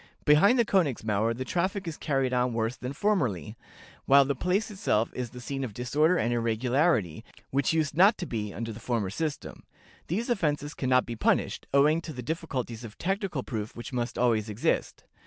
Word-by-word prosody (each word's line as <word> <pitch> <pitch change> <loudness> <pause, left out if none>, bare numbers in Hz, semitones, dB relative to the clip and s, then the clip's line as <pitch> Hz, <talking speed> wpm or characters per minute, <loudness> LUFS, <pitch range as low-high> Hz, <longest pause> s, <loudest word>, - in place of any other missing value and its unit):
Behind 155 +12 +6
the 235 - +4
Königsmauer 115 - +1
the 130 - -4
traffic 185 +4 -1
is 165 - -4
carried 135 -4 -1
on 125 -1 +1
worse 115 +2 -1
than 125 +1 -6
formerly, 135 - -1 0.5
while 140 0 +6
the 140 - 0
place 180 - -1
itself 190 - 0
is 125 -2 -4
the 125 - -10
scene 135 +2 -4
of 110 -6 -5
disorder 150 +8 +2
and 120 -4 0
irregularity, 120 - +1 0.3
which 135 -1 +1
used 155 -3 0
not 195 +6 +6
to 180 - -4
be 105 -7 -4
under 115 +3 -5
the 110 - -9
former 115 -6 -2
system. 155 +5 -4 0.5
These 225 +9 -1
offenses 150 -8 -1
can 130 - -3
not 125 0 +4
be 120 - -5
punished, - - 0
owing 150 +4 +4
to 160 - -7
the 125 -2 -7
difficulties 125 -6 -4
of 110 -3 -10
technical 190 - -2
proof 110 -4 -5
which 120 +2 -8
must 120 -1 -2
always 115 -3 +1
exist. 105 +2 -1
130 Hz, 190 wpm, -28 LUFS, 115-165 Hz, 0.5 s, Behind